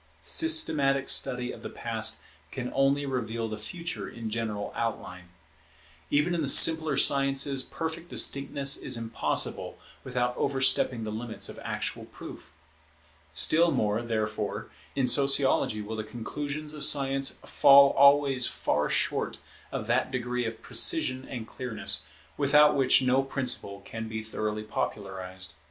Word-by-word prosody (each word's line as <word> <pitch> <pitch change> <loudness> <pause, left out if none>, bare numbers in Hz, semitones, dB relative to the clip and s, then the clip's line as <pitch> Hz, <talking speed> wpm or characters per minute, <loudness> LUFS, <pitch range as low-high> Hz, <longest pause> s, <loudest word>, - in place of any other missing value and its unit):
Systematic 150 - +2
study 125 0 +1
of - - -11
the - - -7
Past - - -2 0.3
can 125 -1 -6
only 135 +1 +1
reveal 115 -4 -3
the 110 -1 -7
Future 170 +9 -6
in 115 -2 -7
general 110 -2 -4
outline. 90 -6 -5 0.8
Even 150 +5 +1
in 170 - -1
the 140 - -1
simpler 160 -1 +6
sciences 135 0 +2
perfect 165 +3 -6
distinctness 140 0 +3
is - - -1
impossible 115 -1 -3 0.3
without 125 -1 -2
overstepping 130 -3 +1
the 110 - -5
limits 110 +1 -5
of - - -10
actual - - -5
proof. - - -12 0.8
Still 165 - +4
more, 105 -6 0
therefore, 110 -3 -4 0.2
in 135 - +1
Sociology 135 -4 +2
will 110 +2 -6
the 110 - -4
conclusions 145 +7 -6
of 150 - -7
Science 135 -1 +2
fall 140 0 +6
always 140 -2 +4
far - - -1
short - - -1 0.3
of - - -4
that 125 +3 0
degree 125 -1 -3
of 110 0 -8
precision 135 - +1
and 115 -4 -7
clearness, 105 -10 -2 0.3
without 150 +1 +4
which 135 -1 +4
no 130 +1 +2
principle 125 -7 -4
can 115 0 -7
be 110 0 -6
thoroughly 110 -1 -4
popularized. 95 -4 -5
130 Hz, 135 wpm, -27 LUFS, 110-140 Hz, 0.8 s, simpler